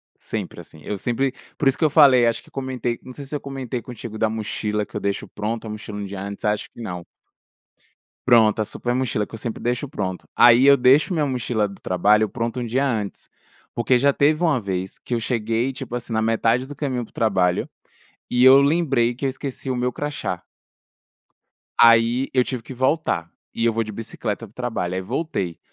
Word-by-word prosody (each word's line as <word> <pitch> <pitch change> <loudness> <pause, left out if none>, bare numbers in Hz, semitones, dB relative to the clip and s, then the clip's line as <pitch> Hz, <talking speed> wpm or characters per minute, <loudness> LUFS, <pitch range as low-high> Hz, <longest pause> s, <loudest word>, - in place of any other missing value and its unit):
Sempre - - -6
assim, 80 - -15
eu 105 - -4
sempre, 125 +5 -1 0.2
por 140 - +1
isso 135 - +3
que - - -2
eu 155 - +5
falei 135 -5 +6
acho 115 0 0
que - - -20
comentei 130 -3 -3
não 130 - -10
sei 140 +2 -9
se 140 - -5
eu 145 - -3
comentei 130 -3 -5
contigo 115 -2 -8
da 110 0 +1
mochila 105 -1 -2
que - - -18
eu 105 - -2
deixo 100 0 -2
pronto 110 +2 -4
a - - -6
mochila 105 -1 -7
um 105 - -4
dia 100 -1 -6
antes, 100 0 -6
acho 105 0 0
que - - -13
não. 90 -6 -6 1.2
Pronto, 110 -2 +5
a - - -2
super 120 +3 -3
mochila 120 -5 0
que - - -13
eu - - -6
sempre 115 0 -5
deixo 125 +4 -1
pronto. 95 -8 -4
Aí 120 +2 +7
eu 140 0 +8
deixo 135 +8 +4
minha 155 -4 +1
mochila 120 -5 0
do 100 -1 -11
trabalho 105 +4 +3
pronta 115 +2 -3
um - - -2
dia 130 +5 +1
antes, 110 -6 -3 0.5
porque 120 +2 +2
já 140 +3 +4
teve 155 +4 +2
uma 155 -7 +2
vez 95 -2 -4
que 125 - -4
eu - - +1
cheguei, 115 +2 -1
tipo 130 -2 -6
assim, 120 -1 -6
na 110 0 +1
metade 115 +3 +1
do 145 - -9
caminho 130 -5 -2
pro - - -19
trabalho, 95 -6 +1 0.6
e 125 - +1
eu 130 +1 +9
lembrei 140 -5 +2
que 125 - -6
eu - - +2
esqueci 135 0 -6
o 130 - 0
meu 125 +1 0
crachá. 145 +3 -4 1.4
Aí 115 +3 +5
eu 125 -1 +4
tive 125 -3 -4
que 130 - -9
voltar, 130 - 0 0.2
e 115 - -1
eu 115 - +3
vou 115 +1 0
de 110 - -7
bicicleta 115 0 -5
pro 105 - -22
trabalho 110 -8 -3
aí 95 - -1
voltei. 100 - -3
120 Hz, 210 wpm, -22 LUFS, 105-130 Hz, 1.4 s, eu